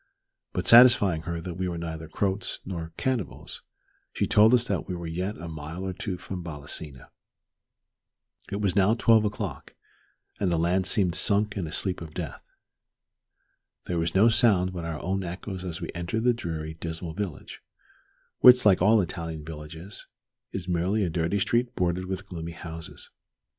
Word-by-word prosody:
But -, -, -3 dB
satisfying 115 Hz, -9 st, +7 dB
her 85 Hz, 0 st, -2 dB
that 85 Hz, 0 st, -6 dB
we 95 Hz, 0 st, -1 dB
were 85 Hz, -1 st, -3 dB
neither 80 Hz, -1 st, -6 dB
Croats 95 Hz, +4 st, -1 dB
nor 85 Hz, -3 st, -5 dB
cannibals, 130 Hz, -, -3 dB, 0.5 s
she -, -, -1 dB
told 110 Hz, +2 st, +5 dB
us 125 Hz, 0 st, +1 dB
that -, -, -2 dB
we 90 Hz, -, -3 dB
were 85 Hz, -1 st, -6 dB
yet 90 Hz, +6 st, -3 dB
a 85 Hz, -, -7 dB
mile 80 Hz, +3 st, -6 dB
or 95 Hz, -, -3 dB
two 90 Hz, 0 st, -4 dB
from 90 Hz, 0 st, -7 dB
Balasina. 75 Hz, -3 st, -5 dB, 1.4 s
It 100 Hz, -, -2 dB
was 95 Hz, -3 st, +1 dB
now 100 Hz, +2 st, +4 dB
twelve 115 Hz, -2 st, +4 dB
o'clock, 105 Hz, -, -5 dB, 0.6 s
and 95 Hz, -3 st, +1 dB
the 85 Hz, -, +2 dB
land 90 Hz, +3 st, +1 dB
seemed 95 Hz, -6 st, +2 dB
sunk 100 Hz, +5 st, +3 dB
in 95 Hz, -5 st, -3 dB
a -, -, -7 dB
sleep 90 Hz, +2 st, -2 dB
of 80 Hz, -2 st, -9 dB
death. -, -, -5 dB, 1.4 s
There 85 Hz, -1 st, -1 dB
was 80 Hz, +2 st, -1 dB
no 105 Hz, +4 st, +6 dB
sound 110 Hz, -6 st, +3 dB
but 85 Hz, -2 st, -5 dB
our 80 Hz, -2 st, -4 dB
own 95 Hz, +2 st, -1 dB
echoes 90 Hz, +2 st, -6 dB
as 90 Hz, -3 st, -5 dB
we -, -, -5 dB
entered 85 Hz, +6 st, -3 dB
the 125 Hz, 0 st, +4 dB
dreary, 80 Hz, -8 st, -5 dB
dismal 80 Hz, +1 st, -6 dB
village, 95 Hz, -3 st, -6 dB, 0.8 s
which, 125 Hz, -1 st, +8 dB
like 95 Hz, -4 st, +5 dB
all 105 Hz, +3 st, +5 dB
Italian 80 Hz, -3 st, -5 dB
villages, 80 Hz, +4 st, -9 dB, 0.4 s
is 95 Hz, -2 st, -5 dB
merely 90 Hz, +4 st, +1 dB
a 90 Hz, -, -1 dB
dirty 85 Hz, +4 st, 0 dB
street 120 Hz, +4 st, 0 dB
bordered 90 Hz, 0 st, 0 dB
with 95 Hz, +1 st, -5 dB
gloomy 85 Hz, -3 st, -7 dB
houses. 80 Hz, -1 st, -9 dB
90 Hz, 170 wpm, -27 LUFS, 80-100 Hz, 1.4 s, which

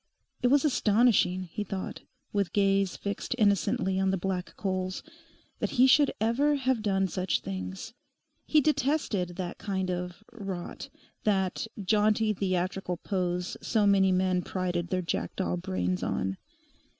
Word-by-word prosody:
It 250 Hz, -, +3 dB
was 280 Hz, +3 st, +4 dB
astonishing, 215 Hz, -7 st, +3 dB
he 185 Hz, +4 st, -5 dB
thought, 190 Hz, -1 st, -5 dB, 0.3 s
with 200 Hz, -3 st, 0 dB
gaze 195 Hz, -2 st, +2 dB
fixed 200 Hz, +4 st, -3 dB
innocently 200 Hz, -3 st, +2 dB
on 190 Hz, 0 st, +2 dB
the 195 Hz, -, +1 dB
black 185 Hz, 0 st, -3 dB
coals, 185 Hz, -1 st, -2 dB, 0.6 s
that -, -, -1 dB
he 255 Hz, -, +7 dB
should 275 Hz, +2 st, +5 dB
ever 255 Hz, +7 st, +2 dB
have 260 Hz, -4 st, 0 dB
done 195 Hz, -2 st, +1 dB
such 185 Hz, +1 st, -1 dB
things. 95 Hz, -, -6 dB, 0.5 s
He 305 Hz, -, +5 dB
detested 275 Hz, -, 0 dB
that 180 Hz, -1 st, -5 dB
kind 190 Hz, -3 st, -2 dB
of 180 Hz, +2 st, -5 dB
'rot'; 195 Hz, -6 st, -6 dB, 0.3 s
that 190 Hz, 0 st, 0 dB
jaunty 215 Hz, +2 st, +2 dB
theatrical 185 Hz, -1 st, -1 dB
pose 180 Hz, -1 st, -2 dB
so 215 Hz, -3 st, +1 dB
many 195 Hz, -1 st, +4 dB
men 185 Hz, 0 st, +2 dB
prided 175 Hz, -2 st, -2 dB
their 185 Hz, 0 st, -1 dB
jackdaw 90 Hz, -, -2 dB
brains 90 Hz, +1 st, -2 dB
on. 95 Hz, 0 st, -1 dB
190 Hz, 140 wpm, -29 LUFS, 180-215 Hz, 0.6 s, he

